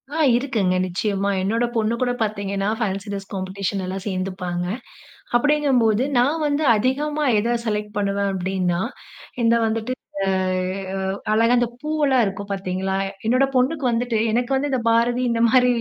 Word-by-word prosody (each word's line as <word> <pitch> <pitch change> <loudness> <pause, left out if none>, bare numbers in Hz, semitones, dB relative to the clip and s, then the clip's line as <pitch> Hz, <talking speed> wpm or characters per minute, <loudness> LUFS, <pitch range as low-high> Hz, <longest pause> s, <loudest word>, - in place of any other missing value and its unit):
ஆ - - -1 0.2
இருக்குங்க 230 -8 +1
நிச்சயமா, 200 +2 -1
என்னோட 225 +5 +1
பொண்ணு 220 0 +1
கூட 250 -1 +2
பாத்தீங்கன்னா 200 -2 -1
ஃபேன்ஸி 200 -2 -2
டிரஸ் 195 -1 -6
காம்பெடிஷன் 195 0 -3
எல்லாம் 190 +1 -5
சேர்ந்துப்பாங்க. 185 -2 -3 0.7
அப்டிங்கும்போது 255 -5 +2 0.2
நான் 290 +6 +2
வந்து 290 +1 0
அதிகமா 290 +6 0
எத 230 +3 +1
செலக்ட் 210 -1 -2
பண்ணுவேன் 200 0 0
அப்டின்னா, 185 -1 -1 0.6
இந்த 230 0 +4
வந்துட்டு 225 +2 -1 0.3
அ - - -2 0.7
அ - - -2 0.3
அழகா 230 +3 +4
இந்த 240 0 +2
பூவெல்லாம் 295 -5 +2
இருக்கும் 200 +1 -5
பாத்தீங்களா? 190 0 -2 0.3
என்னோட 255 +4 +4
பொண்ணுக்கு 270 +3 +1
வந்துட்டு 235 0 0
எனக்கு 240 +3 0
வந்து 285 +2 0
இந்த 260 - +1
பாரதி 240 +2 +2
இந்த 230 0 0
மாரி 250 +1 +5
220 Hz, 145 wpm, -22 LUFS, 195-250 Hz, 0.7 s, மாரி